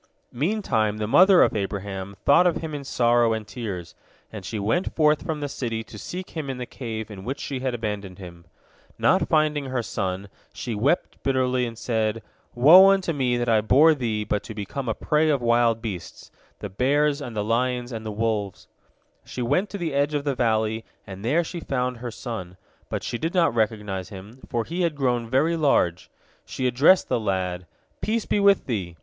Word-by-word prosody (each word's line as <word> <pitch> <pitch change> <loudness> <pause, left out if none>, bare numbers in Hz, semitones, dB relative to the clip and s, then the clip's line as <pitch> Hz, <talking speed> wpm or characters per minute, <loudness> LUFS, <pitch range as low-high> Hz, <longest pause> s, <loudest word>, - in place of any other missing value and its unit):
Meantime 120 - 0
the 110 - -2
mother 185 - +6
of - - +1
Abraham 100 -1 -4
thought 175 +6 +6
of 170 - +1
him 160 -2 -6
in 145 -1 -5
sorrow 120 -3 +2
and 110 -1 -4
tears, 105 -8 -6 0.4
and 105 -3 -7
she 110 +4 -5
went 110 - -1
forth 150 -1 +3
from 160 -4 -3
the 145 - -2
city 115 -5 -4
to 110 - -14
seek 180 - -7
him 155 -4 -5
in 130 - -4
the 125 - -4
cave 110 -4 -6
in 95 -2 -9
which 135 +5 -4
she 135 -2 -4
had 130 -1 -2
abandoned 105 -5 -5
him. 85 -3 -11 0.5
Not - - +2
finding 150 -2 +2
her 130 -2 -2
son, 95 -1 -3 0.2
she 105 +4 -5
wept 130 +11 0
bitterly, 130 -2 +1
and 115 -1 -8
said, 110 -2 -1 0.3
"Woe 170 +10 +8
unto 190 -3 +2
me 125 -4 0
that 120 0 -1
I 110 -2 +4
bore 145 +9 +5
thee 115 -7 -2
but 105 0 -1
to 110 - -8
become 115 +5 -4
a 110 - -1
prey 155 +1 +1
of 145 -3 +2
wild 120 -1 +2
beasts, 95 -7 -7 0.3
the - - -4
bears 145 +7 +1
and 120 -5 -7
the 105 - -1
lions 125 +2 -1
and 110 -2 -5
the 110 - -4
wolves!" 105 -2 -2 0.6
She 125 - -5
went 145 - +1
to 205 - -5
the 165 -5 -3
edge 145 +2 +1
of 145 - -1
the 140 -1 0
valley, 110 -2 0 0.2
and 95 0 -9
there 150 +9 +2
she 170 +1 -6
found 125 -5 -2
her 120 +1 -6
son. 105 -6 -7 0.3
But - - -3
she 120 - -4
did 165 +3 -3
not 170 -8 +3
recognize 105 -4 -2
him, 105 +5 -11
for 120 -2 -1
he 175 +2 -3
had 170 -3 0
grown 120 -4 0
very 150 +7 +2
large. 115 - +1 0.3
She 130 - -4
addressed 140 +9 +4
the - - 0
lad, 90 -4 -2 0.3
"Peace 225 0 -1
be - - 0
with 200 -1 +4
thee!" 95 -9 -4
120 Hz, 200 wpm, -24 LUFS, 105-145 Hz, 0.6 s, Woe